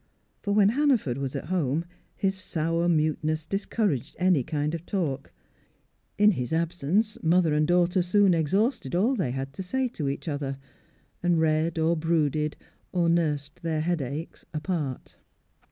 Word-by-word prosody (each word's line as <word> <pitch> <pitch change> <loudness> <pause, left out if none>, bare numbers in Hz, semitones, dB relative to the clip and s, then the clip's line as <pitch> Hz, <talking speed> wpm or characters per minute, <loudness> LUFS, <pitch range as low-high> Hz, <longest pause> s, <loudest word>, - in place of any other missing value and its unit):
For 205 - -2
when 205 -1 +5
Hannaford 240 - +2
was 135 -1 -3
at - - -4
home, 165 -3 0 0.3
his 195 -1 0
sour 165 -2 -1
muteness 155 -1 +1
discouraged 195 - -1
any 180 -5 +3
kind 150 +4 -2
of 165 -1 -4
talk; 155 -8 -2 0.9
in 210 +1 +6
his 125 - -3
absence, 170 +6 0
mother 165 -1 +3
and 150 0 +2
daughter 175 +1 +3
soon 190 +2 +4
exhausted 175 - 0
all 215 +9 +3
they 180 - -1
had 135 +2 -4
to 190 - -6
say 260 +8 -1
to 150 - -3
each 140 - -5
other, 140 -3 -3 0.6
and 175 -2 +2
read 160 +1 +1
or 165 +1 +2
brooded 155 -2 0 0.3
or 175 -2 +2
nursed 150 -4 0
their 160 -2 -1
headaches 155 -2 -3
apart. 155 -5 -3
165 Hz, 150 wpm, -27 LUFS, 150-185 Hz, 0.9 s, in